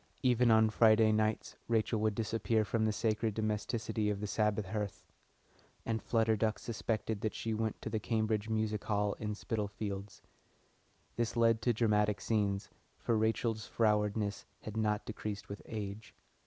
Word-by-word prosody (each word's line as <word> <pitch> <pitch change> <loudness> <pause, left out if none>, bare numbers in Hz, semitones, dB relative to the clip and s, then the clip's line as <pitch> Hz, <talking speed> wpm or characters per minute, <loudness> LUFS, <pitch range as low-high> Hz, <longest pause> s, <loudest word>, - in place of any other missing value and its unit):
Even 125 -1 +4
on 110 -1 +5
Friday 110 -1 +5
nights 110 0 0
Rachel 115 -1 +1
would 110 -1 +1
disappear 110 0 0
from 110 +1 0
the 110 - +2
sacred 110 0 0
domesticity 110 0 -1
of 100 -1 -1
the 105 - -3
Sabbath 105 0 0
hearth, 105 0 -4 0.8
and 110 -1 -1
Flutter 110 -1 +2
Duck 110 0 0
suspected 110 -2 -3
that 110 - -2
she 115 - -2
went 110 0 -2
to - - -3
the 110 - 0
Cambridge 110 -1 0
Music 110 -1 -1
Hall 105 -1 +1
in 105 -1 -3
Spitalfields. 100 -2 -4 0.9
This 120 0 -1
led 115 -1 +4
to 120 - +2
dramatic 105 -2 +2
scenes, 100 -3 0 0.3
for 115 - 0
Rachel's 110 0 0
frowardness 105 -1 +1 0.2
had 110 - -7
not 105 -1 0
decreased 105 -2 -5
with 100 - -6
age. 105 -1 -6
110 Hz, 155 wpm, -33 LUFS, 105-110 Hz, 0.9 s, on